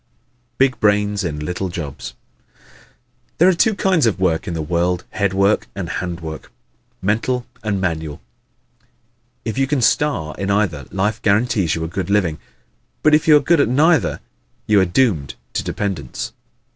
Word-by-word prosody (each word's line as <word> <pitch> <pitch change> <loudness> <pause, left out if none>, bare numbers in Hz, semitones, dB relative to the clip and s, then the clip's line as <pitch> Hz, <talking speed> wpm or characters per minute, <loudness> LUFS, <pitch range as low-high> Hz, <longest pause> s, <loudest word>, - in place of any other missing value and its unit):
Big 130 -1 +2
Brains 105 0 +2
in 80 -4 -3
Little 90 +5 -3
Jobs 80 -5 -6 0.4
¶ - - -32 0.8
There 175 - +5
are 190 - +5
two 210 +5 +2
kinds 185 -10 +2
of 95 -5 0
work 85 -4 0
in 85 - -3
the 80 - -2
world 90 +2 0
head 100 -2 0
work 100 +2 +2
and 95 -4 -4
hand 85 -1 -4
work; 80 -1 -8 0.5
mental 120 +5 0 0.2
and 105 -3 -1
manual. 80 -4 -3 1.3
If 115 +3 -2
you 135 - +2
can 145 -1 0
star 125 - +1
in 95 - -2
either, 95 -9 0
life 105 +3 -1
guarantees 100 -4 +2
you 80 - -3
a - - -2
good 90 +2 -4
living. 95 -6 +1 0.6
But 155 - +5
if 150 +1 +3
you 155 -1 +8
are - - +1
good 165 +1 +3
at 115 - +2
neither 150 +3 +3 0.4
you 105 -2 +4
are - - +3
doomed 90 - +1 0.2
to - - 0
dependence. 90 -11 -4
100 Hz, 170 wpm, -20 LUFS, 85-125 Hz, 1.3 s, you